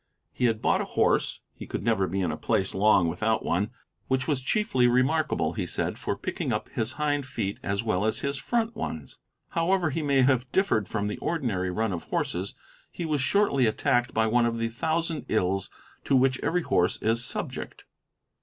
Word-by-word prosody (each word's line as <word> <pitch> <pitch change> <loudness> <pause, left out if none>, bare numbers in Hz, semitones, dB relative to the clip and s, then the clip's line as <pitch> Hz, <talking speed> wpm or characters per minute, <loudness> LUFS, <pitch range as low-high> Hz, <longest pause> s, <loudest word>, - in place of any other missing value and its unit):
He 125 - 0
had 115 -2 +1
bought - - +3
a - - -2
horse, - - +1
he - - -10
could - - -4
never 110 -4 +2
be 95 +3 -2
in 90 -4 0
a - - -3
place 95 +4 0
long 95 -3 +4
without 110 +7 0
one, 100 +5 0 0.4
which 130 -1 0
was 145 -4 +1
chiefly 135 - +2
remarkable, 130 +5 +2
he - - -3
said, - - -2
for - - -2
picking - - -3
up - - -2
his 115 +3 -2
hind 145 -2 -1
feet 100 -6 -3
as 100 +2 -1
well 110 -4 0
as 110 +1 0
his 140 0 -1
front 230 - -1
ones. 80 - -6 0.3
However 170 -1 +1
he 160 - -2
may 140 -3 +3
have 125 -1 +2
differed 150 - +2
from 105 0 -2
the 105 - -3
ordinary 115 - -1
run 110 +2 -1
of 85 - -5
horses, 95 +3 -2 0.3
he 170 - -5
was 150 -3 0
shortly 140 - +3
attacked 120 +3 +1
by 110 - +2
one 120 +2 +3
of 115 0 -2
the 115 0 -1
thousand 160 +6 -1
ills 95 -2 0 0.4
to 135 - +3
which 130 0 +3
every 175 +1 0
horse 90 - +2
is 115 +2 +2
subject. - - -4
120 Hz, 195 wpm, -27 LUFS, 105-145 Hz, 0.4 s, long